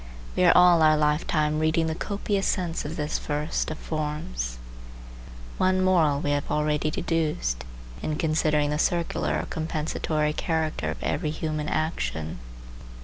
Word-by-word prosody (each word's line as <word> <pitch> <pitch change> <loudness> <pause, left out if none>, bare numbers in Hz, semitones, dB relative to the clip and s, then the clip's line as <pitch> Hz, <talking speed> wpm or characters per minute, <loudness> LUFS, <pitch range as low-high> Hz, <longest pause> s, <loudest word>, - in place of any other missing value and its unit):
We 180 - +3
are 175 - +7
all 180 -2 +7
our 155 -1 +5
lifetime 150 0 +1
reading 160 +1 +2
the 160 - -1
copious 200 +2 -2
sense 175 -5 -1
of 155 +2 -4
this 150 -1 -2
first 150 +1 -2
of 155 - -5
forms. 60 - -4 1.0
One 185 0 +3
moral 160 -6 +3
we 145 - 0
have 145 0 -1
already 150 0 +1
deduced, 150 - -1 0.4
in 155 - -2
considering 155 -2 +1
the 150 - -1
circular 170 0 0
or - - -3
compensatory 155 -1 -1
character 160 0 -1
of - - -5
every 155 - -1
human 155 -1 -3
action. 80 - -2
155 Hz, 145 wpm, -26 LUFS, 150-165 Hz, 1.0 s, are